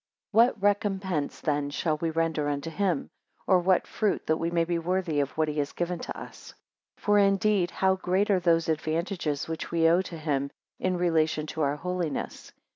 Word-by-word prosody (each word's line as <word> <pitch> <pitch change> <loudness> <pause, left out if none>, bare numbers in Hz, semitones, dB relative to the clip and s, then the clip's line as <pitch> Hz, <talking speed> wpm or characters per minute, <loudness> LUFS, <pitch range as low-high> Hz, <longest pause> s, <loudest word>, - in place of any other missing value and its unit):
4 225 +2 +7
What 225 -4 -4
recompense 195 -6 0
then 145 -2 0
shall 155 +1 -1
we 165 +2 -1
render 160 -2 0
unto 145 +3 -3
him? 185 -4 -1 0.3
Or 185 -2 +4
what 185 +1 +2
fruit 215 -2 -1
that 160 0 +1
may 170 0 +1
be 170 0 -1
worthy 175 -2 -1
of 140 -1 +1
what 155 0 +2
he 150 0 -2
has 140 -1 -2
given 175 0 -2
to - - -6
us? - - -11 0.4
5 - - -25
For 205 0 +5
indeed 195 -2 +3
how 190 0 +1
great 190 +3 +1
are 190 - +4
those 170 -1 +2
advantages 160 -1 -1
which 160 0 -4
we 165 -1 +3
owe 170 +3 +4
to 180 -3 -8
him 140 -3 -1 0.3
in 185 -1 0
relation 160 -3 +1
to 160 +1 -5
our 145 -1 +1
holiness? 175 -1 -4
170 Hz, 195 wpm, -27 LUFS, 155-185 Hz, 0.4 s, 4